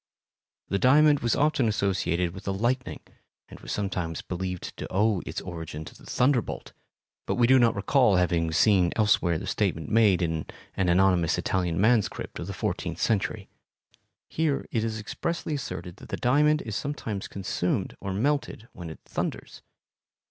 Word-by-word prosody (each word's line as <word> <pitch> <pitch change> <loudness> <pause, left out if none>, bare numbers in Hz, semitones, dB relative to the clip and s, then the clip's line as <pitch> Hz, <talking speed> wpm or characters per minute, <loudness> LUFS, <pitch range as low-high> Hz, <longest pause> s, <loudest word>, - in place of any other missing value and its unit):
The 100 - 0
diamond 145 +4 +5
was 120 -3 +1
often 145 -5 +2
associated 95 -4 0
with 95 +1 -10
the 100 - -1
lightning 120 +5 -1 0.5
and - - -11
was - - -8
sometimes 90 -5 -3
believed 90 0 -5
to - - -5
owe 100 -1 +2
its - - -4
origin 80 -3 -7
to - - -10
the - - -16
thunderbolt, 125 -2 0 0.5
but - - 0
we 120 - +4
do 130 +2 +6
not 120 -2 +4
recall 105 +2 +3
having 85 -2 +1
seen 90 0 +4
elsewhere 105 -6 +3
the 95 - -6
statement 95 -6 -1
made 105 -6 +4
in 80 -2 -2 0.3
an 95 -2 0
anonymous 90 -2 +3
Italian 90 -1 -1
manuscript 110 +1 +1
of - - -5
the - - -4
fourteenth - - -3
century. 105 -1 0 0.8
Here 155 -3 -1
it 115 -3 0
is 110 -1 -2
expressly 160 +9 -3
asserted 95 -10 -5
that - - -13
the - - -3
diamond 150 +4 +3
is 110 -3 -5
sometimes 110 -5 -4
consumed 95 -1 -2
or 95 - -4
melted 125 +1 -1
when 85 -2 -8
it 80 - -10
thunders. - - -5
100 Hz, 165 wpm, -27 LUFS, 90-120 Hz, 0.8 s, do